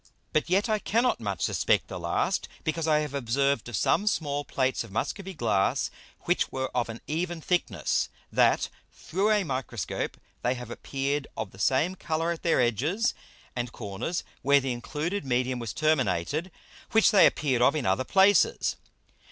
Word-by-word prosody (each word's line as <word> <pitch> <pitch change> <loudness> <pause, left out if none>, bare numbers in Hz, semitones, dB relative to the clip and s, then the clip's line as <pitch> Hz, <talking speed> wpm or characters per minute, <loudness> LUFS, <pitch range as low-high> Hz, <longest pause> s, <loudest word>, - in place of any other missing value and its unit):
But 155 - +1
yet 195 +5 +3
I 215 -1 +1
cannot 235 +5 +1
much 100 -4 -3
suspect - - +2
the - - -6
last, - - 0 0.2
because 160 +1 -1
I 150 -1 +4
have 150 -2 -4
observed 140 -1 0
of 120 - -4
some 190 - +2
small 145 -7 0
Plates 130 -3 0
of 115 - -12
Muscovy 190 - -3
Glass 105 -8 +1 0.3
which - - 0
were 130 0 -3
of 120 -2 0
an 115 +1 -7
even 170 +2 -2
thickness, 150 - 0 0.2
that - - +3 0.2
through 195 +6 -1
a 210 -2 +3
Microscope 130 - -3 0.2
they 125 +1 +1
have 120 -1 -8
appeared 140 +3 -2
of 100 - -4
the 95 - -15
same 135 - +2
Colour 165 -2 -1
at 170 - -4
their 165 - +2
edges 145 - +1 0.4
and 120 -1 -3
corners 105 - -4 0.2
where 140 +1 +5
the 135 -2 -2
included 150 +10 -3
Medium 125 -1 0
was 115 -3 -4
terminated, 150 - 0 0.4
which 220 0 +6
they 195 -5 +7
appeared 130 -5 0
of 135 +4 +5
in 150 - -1
other 95 +7 +2
places. 200 - +3
140 Hz, 170 wpm, -27 LUFS, 120-170 Hz, 0.4 s, they